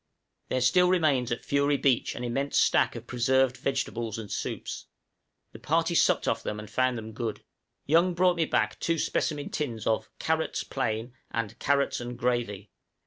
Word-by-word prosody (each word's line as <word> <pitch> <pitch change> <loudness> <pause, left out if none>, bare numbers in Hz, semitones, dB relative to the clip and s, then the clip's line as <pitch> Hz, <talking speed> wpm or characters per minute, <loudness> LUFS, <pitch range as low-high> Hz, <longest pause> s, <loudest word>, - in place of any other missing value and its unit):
There 130 - 0
still 180 +8 +4
remains 150 -9 +2
at 120 - -3
Fury 140 0 +2
Beach 135 -4 +1
an 125 - -5
immense 135 +4 -1
stack - - +3
of 115 0 -7
preserved 130 +1 +2
vegetables 120 -5 -2
and 110 -3 -7
soups; - - -4 0.6
the - - -11
party - - +1
supped - - +3
off - - +1
them 105 - -4
and 105 - -8
found 130 +3 +1
them 110 0 -7
good. 115 -1 -4 0.4
Young 170 +4 +3
brought 180 0 +3
me 165 - +2
back - - 0
two 165 0 0
specimen 150 -1 -1
tins 120 -8 -3
of 110 - 0
"carrots 160 0 -1
plain" 115 -2 -3 0.2
and 115 -1 -4
"carrots 140 -2 +1
and 120 0 -6
gravy." 115 -5 -1
125 Hz, 170 wpm, -28 LUFS, 115-145 Hz, 0.6 s, still